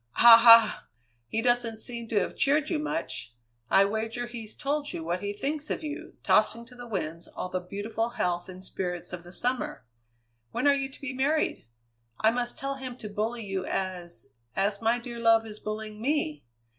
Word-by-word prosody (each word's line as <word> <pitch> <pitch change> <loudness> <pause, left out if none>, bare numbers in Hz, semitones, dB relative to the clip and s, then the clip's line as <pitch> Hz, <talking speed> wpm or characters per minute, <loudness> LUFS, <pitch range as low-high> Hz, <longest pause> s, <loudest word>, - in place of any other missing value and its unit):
"Ha! 235 -1 +10
ha! 230 -1 +7 0.4
He 225 - -2
doesn't 240 -2 +2
seem 235 0 -5
to 220 -2 +2
have 185 - -2
cheered 295 +3 +2
you 320 - +1
much. 300 - -4 0.3
I 195 - +6
wager 225 +4 -2
he's 230 -3 -8
told 290 +1 -2
you 165 - -4
what 175 +2 -2
he 205 0 -2
thinks 285 +8 -3
of - - -2
you, 300 -1 -6
tossing 235 0 +3
to 250 +1 -16
the 245 0 -9
winds 165 -6 -4
all 185 - -6
the 185 - -1
beautiful 205 +5 -3
health 180 -7 -2
and 185 0 -10
spirits 180 -2 -4
of 180 - -5
the 175 +1 -13
summer! 245 - -2 0.6
When 120 - -2
are 285 - +7
you 270 -1 -1
to - - -15
be 280 -1 -4
married? 280 - 0 0.5
I 220 - +4
must 240 0 -3
tell 275 0 -3
him 255 -2 -7
to 215 - -7
bully 220 +2 -2
you 195 -1 -2
as 180 -2 -4 0.3
as 200 +2 0
my 230 +2 +3
dear 235 -1 -7
love 225 -1 +4
is 215 -1 -9
bullying 215 0 -5
me! 225 - -1
225 Hz, 195 wpm, -28 LUFS, 195-250 Hz, 0.6 s, Ha